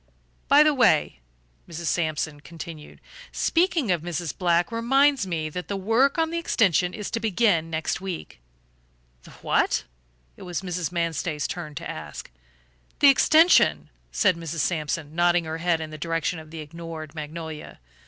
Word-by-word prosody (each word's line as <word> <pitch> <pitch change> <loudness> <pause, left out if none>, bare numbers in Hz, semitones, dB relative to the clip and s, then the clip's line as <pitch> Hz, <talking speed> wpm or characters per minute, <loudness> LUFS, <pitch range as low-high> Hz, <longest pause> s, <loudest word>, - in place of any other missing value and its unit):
"By 290 +1 +7
the 305 0 +3
way," 235 - +3 0.5
Mrs. 170 0 -6
Sampson 155 -2 -1
continued, 160 0 -10 0.3
"speaking 335 - +1
of 175 -3 +1
Mrs. 170 -2 -4
Black 175 -2 +1
reminds 270 +1 +2
me 160 -3 -2
that 180 +3 -6
the 200 - -3
work 225 - +2
on 325 0 +1
the 335 - -1
extension 185 - +2
is 210 -2 -5
to 230 - -1
begin 205 -6 +1
next 160 +2 -2
week." 180 - -6 0.8
"The - - -16 0.2
what?" - - +2 0.5
it - - -15
was 180 +1 -5
Mrs. 180 -2 -3
Manstey's 165 -3 -2
turn 170 -6 -5
to - - -6
ask. - - -8 0.7
"The 285 - +7
extension," 270 - +4 0.2
said 165 - +2
Mrs. 165 -1 -4
Sampson, 155 -1 -2
nodding 175 +1 +3
her 160 +1 -4
head 170 -1 +1
in 160 -1 -6
the 155 - -9
direction 165 +1 -2
of 155 -1 -12
the 160 0 -7
ignored 160 0 -8
magnolia. 155 0 -7
170 Hz, 155 wpm, -25 LUFS, 155-200 Hz, 0.8 s, By